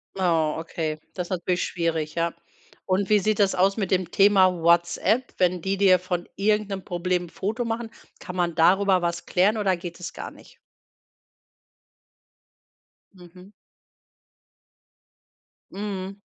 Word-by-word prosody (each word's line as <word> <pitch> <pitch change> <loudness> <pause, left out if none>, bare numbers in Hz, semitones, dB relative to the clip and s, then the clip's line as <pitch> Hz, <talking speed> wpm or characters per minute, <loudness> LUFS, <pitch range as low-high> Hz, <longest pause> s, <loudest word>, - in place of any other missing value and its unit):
Oh, 165 -5 +1
okay, 160 -1 -4
das 180 -2 -4
ist - - -19
natürlich 180 0 -1
schwierig, 165 -3 -2
ja. 170 0 0 0.5
Und 190 +2 0
wie 210 - +5
sieht 215 +1 0
das 195 -1 +3
aus 195 +3 +2
mit 195 -4 -2
dem 185 -2 0
Thema 195 -2 +5
WhatsApp, 170 +9 +2
wenn 180 -1 +1
die 195 +3 -1
dir 185 -3 +5
von 180 -1 -4
irgend 210 +1 +1
'nem 195 -2 -5
Problem 180 0 -2
'n - - -15
Foto 220 +8 -3
machen? 230 0 -3 0.3
Kann 180 -2 -8
man 175 -2 0
darüber 185 +3 +3
was 170 0 -2
klären 195 +4 +2
oder 195 -4 +1
geht 175 0 -8
das 180 - -6
gar - - -7
nicht? - - -18 2.6
Mhm. 180 +1 -15 2.2
Mhm. 195 -1 -5
185 Hz, 140 wpm, -24 LUFS, 175-200 Hz, 2.6 s, wie